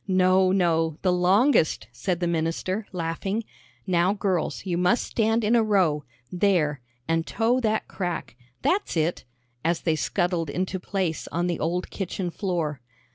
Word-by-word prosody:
"No, 185 0 +4
no, 165 -4 +2
the 185 -2 +3
longest," 185 - +3
said 180 -2 -2
the - - +2
minister, 170 +5 -1
laughing. 180 +5 -2 0.4
"Now, 180 0 +2
girls, 195 -5 -1
you 180 -2 -1
must 180 +6 +2
stand 225 0 +1
in 215 +3 +3
a 235 - +5
row 185 -9 +2 0.3
there 175 -7 +1 0.3
and 165 0 0
toe 235 +3 +1
that 220 -3 0
crack. 175 - -4 0.3
That's 385 - +1
it," 160 -1 0 0.4
as 170 +1 +1
they 160 -2 +1
scuttled 175 -1 0
into 185 +4 -2
place 180 -3 -2
on 170 +1 -1
the 175 -1 -1
old 175 +3 -2
kitchen 185 -2 -3
floor. 165 - -2
180 Hz, 150 wpm, -25 LUFS, 165-195 Hz, 0.4 s, a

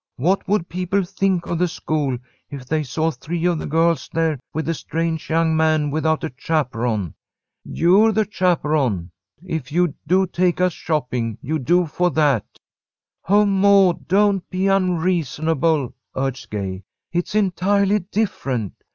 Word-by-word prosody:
What 180 +10 0
would 195 -3 +1
people 185 +3 -1
think 190 -1 -1
of 170 - -2
the 180 - +3
school 150 -6 -2 0.3
if 140 -3 -8
they 155 +4 0
saw 155 +4 -1
three 170 +2 -4
of 175 -3 +1
the - - -5
girls 165 +2 +1
there 160 -3 0
with 160 +1 -3
a 165 - +1
strange 165 0 -3
young 160 0 +2
man 155 -2 +2
without 160 +1 0
a 160 - -4
chaperon?" 120 - -1 0.5
"You're 195 +6 +3
the 215 0 +1
chaperon. 150 - 0 0.3
If 155 -6 -4
you'd 175 -1 +1
do 190 +3 +3
to - - -15
take 180 0 +1
us 180 -1 +2
shopping, 125 -9 -2
you'd 150 0 -3
do 175 +3 +3
for 175 +3 0
that." 145 - +2 0.8
"Oh, 205 +1 +5
Maud, 195 -2 +3
don't 195 +1 +2
be 185 0 -1
unreasonable," 165 -6 +1 0.2
urged 135 -1 -3
Gay. 95 -3 -4 0.3
"It's 175 +3 -2
entirely 200 +1 +2
different. 155 - -2
165 Hz, 150 wpm, -21 LUFS, 145-185 Hz, 0.8 s, Oh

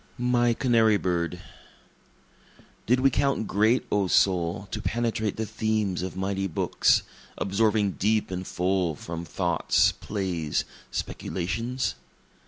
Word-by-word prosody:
My 120 -1 +2
Canary 115 -5 +3
Bird 85 -4 -1 1.5
Did 125 +3 +3
we 135 0 +4
count 135 -3 +1
great, 110 +5 +2
O 100 -2 +2
soul, 90 +1 +2
to - - -3
penetrate 115 -3 -1
the 110 - -1
themes 110 -4 -1
of 95 0 -5
mighty 95 +1 -1
books, 80 - +2 0.3
Absorbing 105 0 +1
deep 105 0 +1
and 90 0 -4
full 90 -2 0
from 85 +3 -6
thoughts, 85 +1 +2
plays, 90 -7 -2 0.2
speculations? 115 - -3
100 Hz, 115 wpm, -26 LUFS, 90-110 Hz, 1.5 s, we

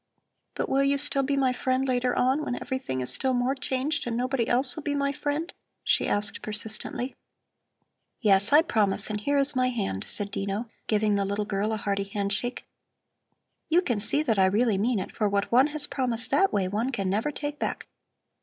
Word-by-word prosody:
"But - - -2
will 275 +1 +2
you 280 0 +2
still 280 -1 +1
be 275 +1 -1
my 260 -2 +2
friend 260 +1 0
later 250 -1 0
on, 265 +4 +2
when 245 - -2
everything 260 - -3
is 125 - +6
still 260 -1 +4
more 245 +2 +1
changed 275 +1 -2
and 230 -1 -2
nobody 250 -1 0
else 255 +1 +2
will 310 - -6
be 290 -1 -2
my 280 0 0
friend?" 290 +4 -3 0.3
she - - +2
asked 205 0 0
persistently. 215 +4 -3 1.1
"Yes, 200 -1 +3
I 300 +3 +7
promise; 210 - +1
and 210 0 -3
here 285 +6 +1
is 280 +1 +3
my 255 0 +2
hand!" 200 - -3
said 205 0 -4
Dino, 200 +4 -3 0.2
giving 210 -1 +2
the 200 - +1
little 200 +1 -2
girl 205 +1 -1
a 220 - -1
hearty 200 -1 -2
handshake. 200 +4 -3 1.0
"You 345 +3 +4
can 240 -10 -1
see 285 +8 0
that 225 -9 +1
I 190 - +5
really 210 +1 +2
mean 230 +3 +1
it, 190 - -5
for 210 -2 +1
what 200 0 -1
one 255 +4 +5
has 300 -1 +1
promised 245 -4 -2
that 345 +8 +3
way, 195 -2 0
one 220 +7 -1
can 200 -6 -2
never 210 +9 0
take 295 0 -5
back. - - -3
245 Hz, 200 wpm, -26 LUFS, 205-275 Hz, 1.1 s, I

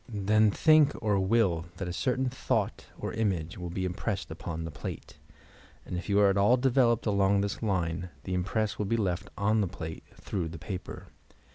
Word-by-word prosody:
Then 110 0 +3
think 155 +6 +5
or 105 -3 +1
will 95 -4 +2
that 95 - -4
a 90 - -3
certain 130 +5 0
thought 125 +1 -1
or - - -4
image 95 -6 -1
will 90 -1 -5
be 95 +2 -2
impressed 95 +2 -3
upon 80 0 -5
the 80 - -5
plate; - - -8 0.7
and - - -5
if 90 +2 -5
you 100 0 +4
are 100 -1 +6
at 95 - -1
all 105 +6 +5
developed 125 -2 +3
along 100 -1 +3
this 100 0 -3
line, 90 -4 -1
the 95 - -4
impress 100 +4 -1
will 105 - -1
be 115 - +1
left 100 -2 -1
on 105 +2 +2
the 100 - +1
plate, 80 -3 -7
through 90 -4 -3
the 85 - -8
paper. 95 +3 -7
100 Hz, 190 wpm, -29 LUFS, 90-110 Hz, 0.7 s, are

